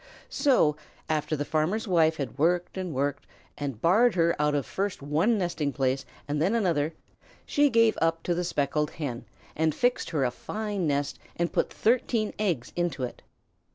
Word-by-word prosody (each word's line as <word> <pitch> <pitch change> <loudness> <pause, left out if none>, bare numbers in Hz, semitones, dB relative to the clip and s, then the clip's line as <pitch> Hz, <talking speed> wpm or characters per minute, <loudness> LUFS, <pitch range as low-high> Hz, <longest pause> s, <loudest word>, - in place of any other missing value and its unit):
So, 250 - +3 0.3
after 155 0 0
the 145 0 -2
farmer's 165 +10 0
wife 160 -3 +3
had 140 -1 -5
worked 175 +3 +1
and 185 -2 -3
worked, 140 0 -2 0.3
and 140 -6 -4
barred 215 - +4
her 170 -1 +3
out 150 0 +2
of 140 -3 0
first 195 - -3
one 165 +11 +2
nesting 175 -6 -1
place 135 -1 0 0.2
and 145 +1 -1
then 190 +8 +2
another, 165 -7 +1 0.5
she 290 0 +3
gave 230 -2 +3
up 165 0 +1
to 175 - 0
the 175 +1 -1
Speckled 150 -2 0
Hen 135 -7 -5 0.3
and 155 -1 +1
fixed 245 0 +1
her 150 -5 0
a 125 - 0
fine 205 - -3
nest 145 -1 -1 0.2
and 170 0 -1
put - - +1
thirteen 230 -2 +1
eggs 175 - -1
into 175 -7 -1
it. 125 - -5
165 Hz, 175 wpm, -27 LUFS, 145-195 Hz, 0.5 s, barred